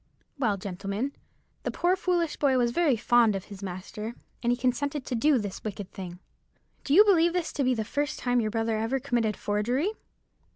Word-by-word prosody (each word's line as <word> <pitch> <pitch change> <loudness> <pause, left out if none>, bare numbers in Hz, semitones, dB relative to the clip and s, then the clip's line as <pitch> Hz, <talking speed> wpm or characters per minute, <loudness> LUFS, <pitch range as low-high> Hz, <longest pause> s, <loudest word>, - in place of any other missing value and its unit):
Well, 215 -7 +1
gentlemen, 200 +6 -3 0.5
the - - -2
poor 355 +2 +2
foolish 350 -4 0
boy 270 -3 +3
was 240 -1 +2
very 300 -1 +3
fond 230 -1 +4
of 195 - -3
his 200 -2 -10
master, 200 +4 -6 0.3
and 240 - +2
he 245 - +1
consented 260 +3 -1
to - - -4
do 280 +4 +3
this 205 -4 -4
wicked 205 -2 -5
thing." 180 -2 -7 0.7
"Do 285 - +2
you 415 +4 +9
believe 345 -4 +4
this 355 -2 -1
to 280 - 0
be 255 -1 +2
the 220 -2 -2
first 290 +6 -2
time 245 -1 +1
your 215 - 0
brother 225 0 0
ever 230 +5 0
committed 230 -5 0
forgery?" 240 - 0
240 Hz, 195 wpm, -28 LUFS, 210-285 Hz, 0.7 s, you